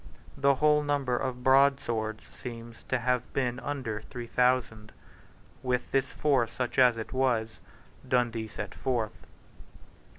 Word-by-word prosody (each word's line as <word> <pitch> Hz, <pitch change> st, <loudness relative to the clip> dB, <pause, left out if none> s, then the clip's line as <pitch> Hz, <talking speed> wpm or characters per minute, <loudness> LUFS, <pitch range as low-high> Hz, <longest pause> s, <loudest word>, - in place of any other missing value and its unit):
The 140 Hz, 0 st, +3 dB
whole 150 Hz, +2 st, +4 dB
number 145 Hz, -4 st, 0 dB
of 125 Hz, -1 st, -3 dB
broadswords 130 Hz, -5 st, +2 dB
seems 115 Hz, -2 st, -9 dB
to 130 Hz, -, 0 dB
have 125 Hz, 0 st, -1 dB
been 125 Hz, -2 st, -1 dB
under 125 Hz, -5 st, -4 dB
three 120 Hz, +2 st, -8 dB
thousand. 120 Hz, -3 st, +1 dB, 0.7 s
With 125 Hz, -1 st, -1 dB
this 135 Hz, 0 st, +2 dB
force, 130 Hz, -6 st, +1 dB
such 125 Hz, +1 st, -2 dB
as 125 Hz, -2 st, +6 dB
it 110 Hz, -, -6 dB
was, 120 Hz, -4 st, 0 dB, 0.5 s
Dundee 120 Hz, -3 st, +1 dB
set -, -, -6 dB
forth. 120 Hz, -5 st, -3 dB
125 Hz, 130 wpm, -29 LUFS, 115-135 Hz, 0.7 s, as